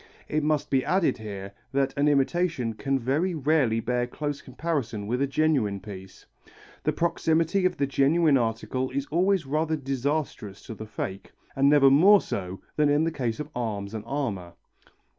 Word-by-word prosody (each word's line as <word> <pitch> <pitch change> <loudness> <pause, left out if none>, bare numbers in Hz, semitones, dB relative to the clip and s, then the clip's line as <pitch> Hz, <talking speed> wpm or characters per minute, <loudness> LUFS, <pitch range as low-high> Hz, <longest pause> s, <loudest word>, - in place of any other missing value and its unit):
It 155 - 0
must 150 -1 0
be 135 -2 +3
added 185 -8 +1
here, 100 -2 -7 0.2
that 135 0 +1
an 145 +1 +2
imitation 145 -3 +1
can 135 +4 -1
very 145 +9 0
rarely 140 -6 +2
bear 120 +1 -1
close 145 +2 -4
comparison 130 -7 -3
with 125 +5 -1
a 140 - +2
genuine 135 -8 +1
piece. 95 -1 -11 0.6
The - - +3
proximity 165 +2 +1
of 180 -1 -5
the 140 - +1
genuine 145 +3 +3
article 125 +2 -1
is 140 +1 -2
always 185 +1 +2
rather 155 +3 0
disastrous 135 -6 -3
to - - -7
the 110 0 -8
fake, 95 -2 -6 0.2
and 135 0 +4
never 140 -2 +6
more 195 +9 +7
so 95 - -5 0.2
than 150 -1 +3
in 145 +2 +3
the 165 - 0
case 120 -7 -3
of 150 0 -6
arms 105 -4 -3
and 110 -2 -5
armour. 105 -12 -3
135 Hz, 170 wpm, -26 LUFS, 115-155 Hz, 0.6 s, more